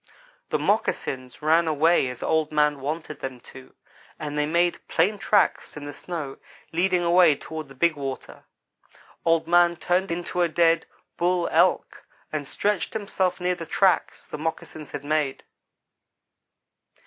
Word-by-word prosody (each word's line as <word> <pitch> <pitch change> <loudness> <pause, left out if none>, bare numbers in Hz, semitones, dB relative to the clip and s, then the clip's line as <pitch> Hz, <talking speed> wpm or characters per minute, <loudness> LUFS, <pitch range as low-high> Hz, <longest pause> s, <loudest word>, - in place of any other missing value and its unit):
"The - - +1
moccasins 130 +1 -1
ran 165 +2 +4
away 160 -1 +3
as 125 -1 -6
Old 160 -1 +1
man 150 -1 +2
wanted 155 +2 -5
them 130 -2 -6
to, 130 0 -14 0.4
and 150 -1 -5
they 150 0 +1
made 170 +2 +1
plain 195 +5 +1
tracks 200 -7 +1
in 150 - -7
the 145 - -6
snow 150 -4 -6 0.4
leading 180 +1 +2
away 175 -3 +5
toward 155 +1 -7
the 135 - -14
big 165 +4 +2
water. 135 -2 -7 0.8
Old 165 -1 +2
man 175 0 +4
turned 180 +3 0
into 175 +1 -2
a 175 - +4
dead 165 0 +2 0.3
Bull 175 0 +1
Elk - - +2 0.3
and 145 -2 -3
stretched 205 +4 -1
himself 195 -4 -1
near 180 0 +1
the 170 -2 -7
tracks 190 -2 +1
the 150 - -7
moccasins 155 -1 -5
had 145 - -7
made. 150 -2 -1
160 Hz, 150 wpm, -25 LUFS, 150-175 Hz, 0.8 s, away